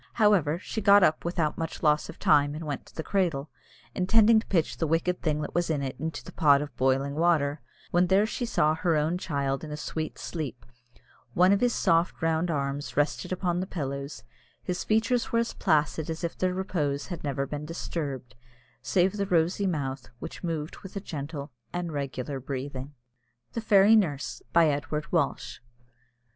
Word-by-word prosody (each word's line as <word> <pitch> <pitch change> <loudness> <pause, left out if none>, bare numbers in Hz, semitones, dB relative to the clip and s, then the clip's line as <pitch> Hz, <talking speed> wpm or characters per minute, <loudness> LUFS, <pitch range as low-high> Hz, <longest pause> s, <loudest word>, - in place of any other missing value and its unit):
However, 200 -8 +3
she 220 +4 -5
got 200 -1 +7
up 155 -2 +3
without 170 -3 -1
much 165 +1 -4
loss 150 -1 +3
of - - -9
time 145 0 +3
and 160 +1 -6
went 145 -3 -5
to - - -18
the 160 - -4
cradle, 160 -8 -1 0.4
intending 220 +4 +5
to - - -8
pitch 165 -5 0
the 165 - 0
wicked 170 +3 0
thing 150 -2 0
that 150 - -5
was 175 0 0
in 145 -3 0
it 130 0 -3
into 160 0 -4
the - - -10
pot 140 -3 +5
of 145 0 -6
boiling 135 +2 +1
water, 150 -3 +2 0.3
when 175 +1 +3
there 195 +3 +4
she 220 - -4
saw 155 -8 +2
her 165 +1 +1
own 155 +4 +1
child 140 -5 -2
in 155 - -6
a 150 - -4
sweet 155 +1 -4
sleep, 140 -8 -5 0.7
one 180 +2 +5
of 200 - +1
his 245 -1 +2
soft 165 +1 +2
round 165 +1 +1
arms 140 -2 -3
rested 145 +4 0
upon 180 -1 0
the 185 - -3
pillow 140 -5 -4 0.6
his 180 0 -2
features 225 +3 +1
were 230 - +2
as 230 0 0
placid 155 +1 +1
as 160 +2 -4
if 170 - -2
their 185 0 0
repose 150 -7 -1
had 175 -3 -6
never 140 -1 -1
been 145 +2 -5
disturbed, 140 -6 -5 0.5
save 185 0 +2
the 200 -1 -1
rosy 180 +2 +2
mouth, 135 -6 -3
which - - -8
moved 160 -3 -3
with 190 - -11
a - - -1
gentle 145 -5 -6 0.2
and 175 -1 -3
regular 140 -1 -4
breathing. 135 +1 -6 0.6
THE 230 - -2
FAIRY 210 0 +6
NURSE. 155 -9 -1
BY 170 -1 +5
EDWARD 150 +2 -2
WALSH. 165 -8 -1
160 Hz, 185 wpm, -27 LUFS, 145-180 Hz, 0.7 s, got